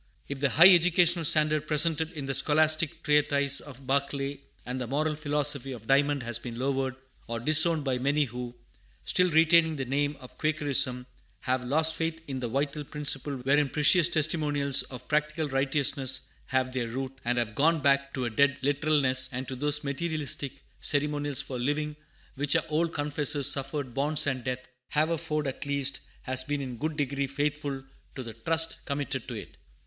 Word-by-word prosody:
If 140 -1 -5
the 140 0 +2
high 175 +8 +8
educational 175 0 +3
standard 155 0 +2
presented 160 +1 +2
in 145 -4 -5
the 135 - -2
scholastic 155 +3 +2
treatise 140 -1 +3
of 135 -2 -12
Barclay 140 +1 -1 0.3
and 125 +1 -4
the 125 - -3
moral 150 +4 -1
philosophy 145 -3 -1
of 115 -3 -10
Dymond 140 +1 +2
has 120 0 -2
been 120 -1 -7
lowered 130 0 -1 0.3
or 115 0 -3
disowned 155 +4 +4
by 130 -2 -1
many 145 +3 +1
who, 125 0 -7 0.5
still 180 0 +2
retaining 160 0 +4
the 135 -2 -3
name 145 +3 -1
of 125 - -14
Quakerism, 145 -5 +1 0.4
have 130 0 -1
lost 160 +5 +1
faith 165 0 -2
in 135 -2 -4
the 125 - -3
vital 140 +4 -2
principle 145 -1 -1
wherein 140 +2 +2
precious 160 +4 +4
testimonials 150 -3 +1
of 125 -1 -10
practical 150 +1 0
righteousness 135 -1 0 0.3
have 130 -1 0
their 125 -2 -2
root, 130 +3 -5
and 120 +1 0
have 115 -2 -1
gone 160 +6 +2
back 140 -1 +2
to 130 -2 -2
a - - -1
dead 140 +3 +3
literalness, 145 -2 +2
and 130 0 -5
to 130 - -5
those 145 +3 0
materialistic 140 -2 -3 0.2
ceremonials 145 -1 0
for 135 -3 -6
leaving 150 +4 -1 0.4
which 145 +1 0
our - - +2
old 165 +2 0
confessors 145 -1 0
suffered 135 -1 -3
bonds 150 +3 +2
and 130 -3 -2
death, 125 0 -4 0.2
Haverford, 155 -1 0
at 135 +1 -3
least, 140 -1 -1 0.2
has 130 0 0
been 145 +2 -2
in 135 -2 -5
a - - -7
good 155 +4 -3
degree 140 -1 -1
faithful 145 0 -3 0.3
to 130 - -5
the 115 -2 -8
trust 160 +8 -1
committed 140 -2 -3
to - - -6
it. - - -9
140 Hz, 175 wpm, -28 LUFS, 130-150 Hz, 0.5 s, high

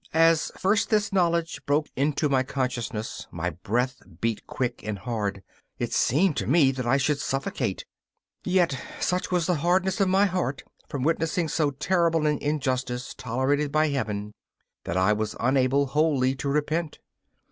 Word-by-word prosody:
As 165 0 +4
first 205 +3 +2
this 210 -2 +1
knowledge 170 -3 +1
broke 145 +2 +2
into 145 +2 +1
my 135 -2 +2
consciousness 125 -5 -3
my 85 +2 -3
breath 120 - -2 0.2
beat 115 +1 -2
quick 125 -2 -3
and 105 -1 -3
hard; 100 -1 -3 0.3
it - - -3
seemed 155 +5 +3
to - - -1
me 140 -2 +5
that 130 -2 -4
I 135 +3 +4
should 140 +1 +1
suffocate. 135 0 -2 0.6
Yet 180 -5 +2 0.2
such 180 +1 0
was 180 -3 +1
the 180 -2 +1
hardness 185 +3 +2
of 195 - +3
my 195 +2 +4
heart 180 -8 -2 0.3
from 140 -3 -3
witnessing 165 +2 0
so 150 -1 +1
terrible 165 +2 +1
an 150 -1 +1
injustice 130 -4 -2
tolerated 135 +4 0
by 155 +1 +3
Heaven, 105 -7 -3 0.5
that 85 - -2
I 95 +3 +4
was 105 0 -2
unable 130 +3 +2
wholly 140 -2 +2
to 140 0 -2
repent. 150 +3 -1
140 Hz, 160 wpm, -26 LUFS, 125-165 Hz, 0.6 s, me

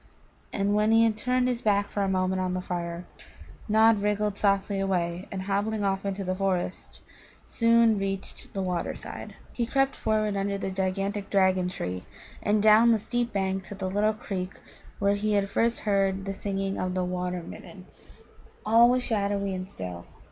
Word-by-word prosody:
And 200 0 0
when 210 +1 +3
he 225 0 +6
had 225 -2 +2
turned 250 +3 +1
his 245 -1 -1
back 200 -1 +1
for 205 - -1
a 195 - +1
moment 185 0 0
on 185 0 -1
the - - -1
fire, 175 -1 -4 0.6
Nod 220 0 +5
wriggled 210 0 0
softly 200 -1 +1
away, 180 -2 -1
and, 190 -1 -4
hobbling 205 +2 -1
off 195 0 0
into 195 0 -3
the 185 0 -1
forest, 185 -1 -3 0.4
soon 230 -2 +3
reached 195 0 -5
the 195 - -1
water 180 -2 -2
side. - - -8 0.2
He 235 -2 -1
crept 270 +1 +1
forward 215 -1 0
under 200 0 -1
the 195 -1 -3
gigantic 195 +2 -2
dragon 190 -2 +3
tree, 90 - -5 0.3
and 210 0 +1
down 220 +2 +7
the - - +3
steep 240 +3 -2
bank 190 -1 -1
to 205 - -7
the 190 -1 -3
little 210 +2 +2
creek 185 -3 -5 0.4
where 200 0 +2
he 210 +1 0
had 200 -1 +1
first 235 0 +1
heard 195 -2 +1
the 195 - -3
singing 195 0 -3
of 185 0 -2
the 185 -1 0
Water 180 -1 -3
midden. 185 +2 -11 0.8
All 230 +2 +6
was 250 0 +2
shadowy 200 -3 -1
and 185 0 -5
still. 90 -2 -7
200 Hz, 180 wpm, -27 LUFS, 185-215 Hz, 0.8 s, down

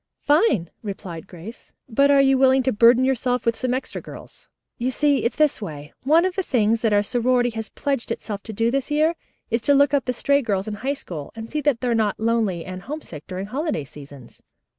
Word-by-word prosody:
"Fine," 290 - +2
replied 190 -4 -7
Grace. 185 +6 -12
"But 275 +4 +3
are 280 -1 +6
you 270 0 +4
willing 265 0 +4
to 260 - +1
burden 235 +3 +5
yourselves 250 -2 0
with 230 -1 +2
some 255 +1 -2
extra 255 +1 -3
girls? - - -12 0.3
You 245 +2 0
see 285 +1 +1
it's 235 - 0
this 305 -5 +2
way. 150 -6 -8
One 320 +5 +5
of 375 - -1
the 385 - -1
things 230 - +1
that 225 - +1
our 205 0 +3
sorority 245 +2 +1
has 220 -1 -6
pledged 275 -4 -2
itself 210 -3 -4
to 225 - -5
do 225 +2 0
this 275 +1 -1
year 305 +3 +2 0.4
is 230 +1 +1
to 285 +4 +3
look 285 0 +4
up 280 - +2
the 250 - 0
stray 280 +3 +2
girls 200 -4 -2
in 215 - -3
High 265 +7 -2
School, 160 - -8
and 225 0 -8
see 300 - -1
that 280 -5 +1
they 250 - -1
are 240 - +2
not 215 -3 0
lonely 220 -7 0
and 185 0 -7
homesick 210 - -8
during 185 +1 -5
holiday 270 - -2
seasons. 140 -3 -13
235 Hz, 225 wpm, -22 LUFS, 205-275 Hz, 0.4 s, are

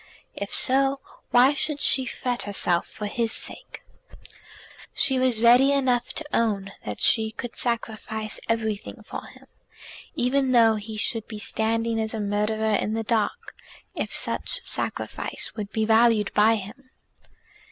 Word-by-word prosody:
If 200 - -6
so, 270 +1 +3 0.3
why 255 +4 +5
should 290 +1 -2
she 265 -2 +3
fret 245 0 -3
herself 180 -4 +2
for 210 - -8
his 225 +2 -1
sake? - - -2 1.1
She 265 -2 +3
was 250 -3 +1
ready 250 +4 +6
enough 255 -3 0
to 315 - -6
own 200 -4 0
that 105 -1 -6
she 220 -1 +3
could 230 +2 -8
sacrifice 220 -2 -2
everything 220 -2 -3
for - - -8
him, - - -17 0.7
even 260 -1 +1
though 230 -2 +5
he 215 0 -6
should 225 +1 -1
be 215 - -8
standing 225 +1 -1
as 220 +1 -2
a - - -4
murderer 210 +1 -1
in 210 +1 0
the 225 0 -2
dock, 220 -2 -2 0.4
if - - -4
such - - +1
sacrifice - - -3
would 210 -2 -6
be 220 -1 -1
valued 225 -2 +3
by 220 +2 +4
him. 220 +6 -9
225 Hz, 145 wpm, -24 LUFS, 215-250 Hz, 1.1 s, ready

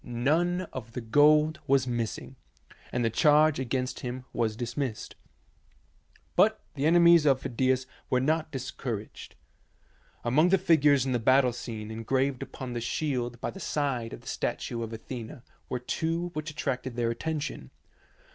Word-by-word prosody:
None 155 +9 +1
of 115 -3 -7
the - - -3
gold 150 +6 +4
was 135 -1 +3
missing, 120 +1 -3 0.6
and 120 - 0
the 115 - +1
charge 150 +4 +4
against 130 0 -2
him 125 +1 -5
was 110 -2 0
dismissed. 120 0 -4 1.2
But - - +4
the 140 +3 0
enemies 170 -1 +6
of 135 -2 +4
Phidias 130 +1 +1 0.2
were 125 - +3
not 155 +4 0
discouraged. 125 -5 -6 0.9
Among 150 +9 +3
the 195 - +5
figures 150 -7 +4
in 130 - -1
the 120 - +1
battle 130 +1 +4
scene 110 -3 -6
engraved 130 +4 -1
upon 130 -2 -6
the 120 - -3
shield 120 -2 -2
by - - -2
the 195 - -10
side 135 -9 -2
of - - -8
the - - -16
statue 115 -1 -3
of 115 -1 -4
Athena 115 +2 -7 0.3
were - - -1
two 165 +7 -2
which 155 0 -4
attracted 130 -4 -3
their 120 -1 0
attention. 145 - -4
130 Hz, 150 wpm, -28 LUFS, 120-150 Hz, 1.2 s, enemies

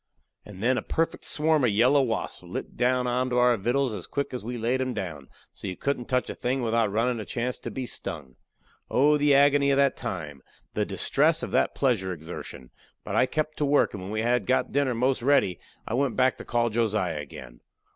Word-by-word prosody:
And 100 -1 -10
then 125 +1 +3
a - - -5
perfect 165 +8 -2
swarm 155 -1 +1
of 125 - +4
yellow 125 +7 +4
wasps 115 -4 -2
lit - - -7
down 125 +1 +1
onto 125 0 0
our 125 0 +5
vittles 120 +4 0
as 100 -4 -6
quick 140 -1 -3
as 125 - -4
we 120 +2 -4
laid 120 +3 0
'em 130 -2 -2
down, 85 -9 -5 0.2
so - - -8
you 90 - -4
couldn't 140 -3 -2
touch 125 -1 0
a - - -4
thing 130 +1 -2
without 115 -2 +1
runnin' 115 +3 0
a - - -4
chance 120 +4 -3
to - - -6
be 130 - -4
stung. 75 - -6 0.5
Oh, 145 +4 +4
the 145 -1 +4
agony 140 0 +5
of 140 - +3
that 140 -1 +3
time! 80 - -5 0.3
the - - 0
distress - - +1
of - - -4
that - - +1
pleasure 115 -9 +1
exertion! 80 -6 -9 0.3
But - - -4
I 130 - +4
kep' 155 +2 -2
to 150 - +1
work, 145 +1 +3
and 100 - -6
when 95 +2 -6
we 110 +1 -1
had 120 -3 +1
got 130 - +1
dinner 135 -3 +1
most 130 +2 +1
ready 120 -9 +2 0.3
I - - -3
went 130 0 +1
back 130 0 +3
to - - -9
call 120 -1 +1
Josiah 105 -8 0
again. 65 -4 -10
125 Hz, 215 wpm, -26 LUFS, 105-135 Hz, 0.5 s, our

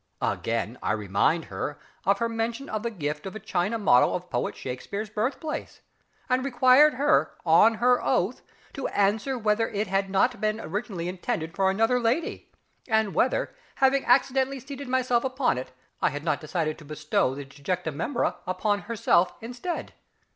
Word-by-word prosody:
Again, - - -1
I - - 0
reminded 105 - +1
her 145 - -4 0.3
of 200 0 +4
her 230 - 0
mention 230 +4 -3
of 215 - -2
the 235 - -2
gift 150 -6 -4
of 190 - -7
a - - -5
china 195 +3 -1
model 125 - +4
of 180 0 -6
Poet - - -1
SHAKSPEARE'S 200 +12 -5
birthplace, 265 +9 -3 0.5
and 255 0 +1
required 265 +2 +5
her 290 +3 +2
on 210 +8 +6
her 245 +2 +3
oath - - 0 0.3
to 270 - -3
answer 210 +6 +1
whether 215 0 +1
it 205 +1 -1
had 195 0 0
not 200 +4 +1
been 215 0 0
originally 190 -2 -4
intended 170 -2 -3
for 195 -1 +3
another 225 +6 +2
lady, 245 +8 -1 0.4
and 220 -4 +1
whether, 255 - +1 0.2
having 270 0 +3
accidentally 265 +1 +2
seated 280 +1 -8
myself 250 -2 +1
upon 260 - 0
it, 130 - -8 0.3
I - - +3
had 145 +1 -6
not 155 - 0
decided 155 -1 -2
to 155 - -13
bestow 155 0 0
the 140 0 -6
disjecta 160 +5 -3
membra 205 - -1
upon 205 +3 0
herself 185 -5 +2
instead. 245 +10 -5
215 Hz, 165 wpm, -26 LUFS, 175-250 Hz, 0.5 s, on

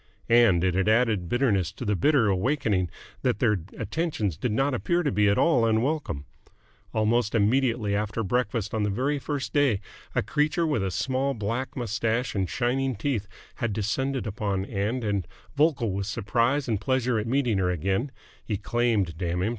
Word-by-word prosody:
And 115 -7 +5
it 90 -1 +2
had 95 +3 +1
added 110 -6 +2
bitterness 105 - +1
to 125 - -7
the 105 -1 +1
bitter 125 - +3
awakening 100 - +1 0.3
that - - +1
their 105 -3 +2 0.2
attentions 115 - -2
did 115 +9 -2
not 135 +6 +1
appear 170 +8 0
to 145 - +1
be 105 +1 +3
at 100 - +2
all 155 -9 +4
unwelcome. 115 - 0 0.7
Almost 110 +1 +1
immediately 115 -1 +2
after 105 +2 -1
breakfast 110 0 -1
on 110 - 0
the 105 - +1
very 135 +8 0
first 140 -1 -4
day, 140 -9 +3 0.4
a - - +2
creature 155 - +1
with 145 -10 0
a 95 - 0
small 135 +7 -1
black 115 +6 -3
moustache 115 +1 -1
and 95 -3 -1
shining 130 +1 0
teeth 110 -2 -2 0.3
had 120 -4 -1
descended 130 +6 -1
upon 100 -3 -2
Ann 110 +5 -2
and, 100 -5 -1 0.3
vocal 145 -7 +2
with 100 +1 -3
surprise 120 +7 0
and 110 -4 -1
pleasure 125 -3 +1
at 105 - -3
meeting 120 -5 +1
her 90 -1 +1
again 95 - -1 0.3
he 105 - -2
claimed, 110 -6 0
damn 90 0 -1
him! 105 - +1
115 Hz, 175 wpm, -26 LUFS, 100-130 Hz, 0.7 s, And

